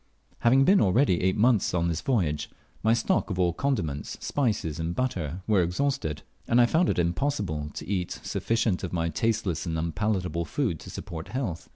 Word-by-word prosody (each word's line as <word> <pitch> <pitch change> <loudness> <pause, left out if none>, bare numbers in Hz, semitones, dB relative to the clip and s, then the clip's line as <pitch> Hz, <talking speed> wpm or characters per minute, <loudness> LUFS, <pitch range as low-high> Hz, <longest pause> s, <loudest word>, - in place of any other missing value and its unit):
Having 130 +3 +5
been 195 +5 +5
already 100 -1 +3
eight 95 +2 +1
months 110 -4 +3
on 85 -1 +1
this 85 -1 -1
voyage, 85 - 0 0.3
my 110 - +3
stock 115 -1 +1
of 95 - -3
all 90 -2 +2
condiments, 80 - -2
spices 105 - -1
and 85 +1 -2
butter, 90 - -2
was 100 -5 +3
exhausted, 90 - -1 0.2
and 120 - +4
I 120 - +7
found 165 +8 +2
it - - 0
impossible 85 - -1
to - - -6
eat 90 -2 -1
sufficient 115 -5 0
of 90 - -4
my 85 -1 0
tasteless 95 -2 -1
and 80 -1 -1
unpalatable 85 0 -1
food 110 - -1
to - - -10
support 80 -2 -7
health. 120 -11 -4
95 Hz, 180 wpm, -27 LUFS, 85-120 Hz, 0.3 s, I